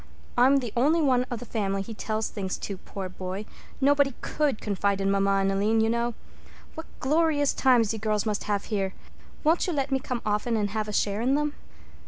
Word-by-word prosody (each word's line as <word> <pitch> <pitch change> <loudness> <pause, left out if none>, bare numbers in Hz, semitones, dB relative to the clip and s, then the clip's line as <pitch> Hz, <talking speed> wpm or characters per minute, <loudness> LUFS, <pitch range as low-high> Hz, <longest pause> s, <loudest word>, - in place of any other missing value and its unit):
I'm 260 +3 +5
the 245 -5 -3
only 295 +8 +3
one 255 -5 +3
of 245 - -3
the 245 - -8
family 195 -3 -1
he 225 - -7
tells 215 0 -2
things 190 -2 -4
to, 200 - -5
poor 195 0 -6
boy—nobody 240 +9 -1
could 295 -7 0
confide 200 -1 0
in 195 0 +1
mamma 195 0 +2
and 195 0 +2
Aline, 210 +3 +2
you 220 0 +3
know. 235 0 -1 0.6
What 320 - -8
glorious 295 0 +2
times 240 -5 +3
you 220 - -4
girls 215 0 0
must 210 -2 -2
have 205 -1 0
here! 195 -3 -2 0.5
Won't 325 +4 +3
you 355 - 0
let 275 -2 -1
me 265 - +2
come 250 -2 -4
often 215 +2 0
and 205 -2 -1
have 215 0 -2
a - - -4
share 205 +1 0
in 260 +3 +2
them?" 295 0 0
225 Hz, 205 wpm, -27 LUFS, 200-270 Hz, 0.6 s, I'm